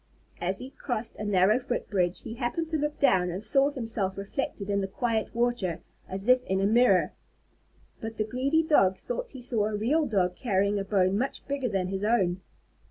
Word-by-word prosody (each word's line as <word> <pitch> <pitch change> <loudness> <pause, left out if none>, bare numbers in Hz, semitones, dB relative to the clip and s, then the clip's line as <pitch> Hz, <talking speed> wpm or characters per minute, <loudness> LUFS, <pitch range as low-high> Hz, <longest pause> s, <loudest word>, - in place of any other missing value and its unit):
As 185 +2 0
he 255 +5 -7
crossed 240 -5 -4
a - - -5
narrow 205 +2 +3
footbridge, 195 -8 -1
he 225 - -6
happened 265 +7 -2
to 320 - -2
look 295 +1 -2
down 180 -9 +3
and 185 +4 -4
saw 270 +6 +3
himself 225 -8 -2
reflected 200 0 -4
in 200 -1 0
the 195 - -2
quiet 225 +3 -2
water 235 -8 0 0.3
as 195 +3 -2
if 255 0 +5
in 190 0 0
a 195 - +2
mirror. 220 -3 +4 0.9
But 225 0 -6
the 215 - +1
greedy 265 +8 +1
Dog 195 - +3
thought - - -5
he 260 -3 -10
saw 225 -4 0
a 215 - -2
real 285 +9 +1
Dog 185 -6 +1
carrying 200 -2 +1
a - - -2
bone 195 0 +2
much 265 +3 -3
bigger 280 -3 -1
than 190 -3 -1
his 195 +1 -3
own. 190 -5 +1
215 Hz, 195 wpm, -28 LUFS, 195-250 Hz, 0.9 s, if